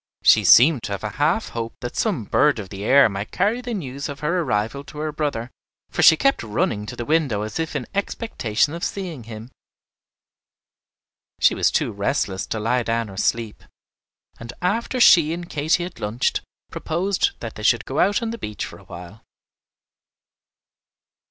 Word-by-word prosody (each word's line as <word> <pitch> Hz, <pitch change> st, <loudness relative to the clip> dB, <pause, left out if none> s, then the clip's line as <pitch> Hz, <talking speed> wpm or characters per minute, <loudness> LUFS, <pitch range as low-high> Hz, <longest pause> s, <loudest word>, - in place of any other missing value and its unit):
She -, -, +6 dB
seemed 135 Hz, +1 st, +6 dB
to 100 Hz, -, -4 dB
have 100 Hz, -, -6 dB
a 110 Hz, -, -2 dB
half 165 Hz, +9 st, +1 dB
hope 115 Hz, -1 st, -5 dB
that 120 Hz, -, -6 dB
some 195 Hz, -, 0 dB
bird 145 Hz, +7 st, +2 dB
of 100 Hz, -4 st, -7 dB
the 100 Hz, 0 st, -7 dB
air 135 Hz, +4 st, +6 dB
might 100 Hz, 0 st, -5 dB
carry 210 Hz, +6 st, 0 dB
the 245 Hz, -2 st, -4 dB
news 140 Hz, -5 st, -5 dB
of 140 Hz, -, -8 dB
her 170 Hz, +4 st, 0 dB
arrival 120 Hz, 0 st, -2 dB
to 150 Hz, -, -12 dB
her 155 Hz, +1 st, -2 dB
brother, 145 Hz, -6 st, -3 dB, 0.4 s
for -, -, -1 dB
she 160 Hz, -, +8 dB
kept 275 Hz, +8 st, +2 dB
running 105 Hz, -1 st, -2 dB
to -, -, -6 dB
the 120 Hz, -, -5 dB
window 140 Hz, -9 st, +1 dB
as 110 Hz, +8 st, -5 dB
if 160 Hz, -1 st, -3 dB
in 130 Hz, -4 st, -2 dB
expectation 155 Hz, -, -1 dB
of 170 Hz, -, -6 dB
seeing 170 Hz, -, -4 dB
him. 115 Hz, +2 st, -9 dB, 1.9 s
She -, -, +4 dB
was -, -, +2 dB
too -, -, 0 dB
restless 95 Hz, 0 st, -2 dB
to 110 Hz, -, -3 dB
lie 120 Hz, +4 st, +1 dB
down 115 Hz, -2 st, -2 dB
or 95 Hz, -, -11 dB
sleep, 115 Hz, 0 st, -1 dB, 0.8 s
and 115 Hz, 0 st, -8 dB
after 225 Hz, +7 st, -1 dB
she 165 Hz, -9 st, +6 dB
and 170 Hz, 0 st, -6 dB
Katy 155 Hz, +3 st, 0 dB
had 180 Hz, -, -8 dB
lunched, 105 Hz, +4 st, -1 dB, 0.3 s
proposed 190 Hz, -, -1 dB
that -, -, -6 dB
they -, -, -9 dB
should -, -, +2 dB
go -, -, -3 dB
out 205 Hz, +4 st, +2 dB
on 225 Hz, -, -2 dB
the 230 Hz, -, -7 dB
beach 105 Hz, -, -5 dB
for -, -, -11 dB
a -, -, -18 dB
while. 90 Hz, +5 st, -11 dB
140 Hz, 185 wpm, -22 LUFS, 110-170 Hz, 1.9 s, she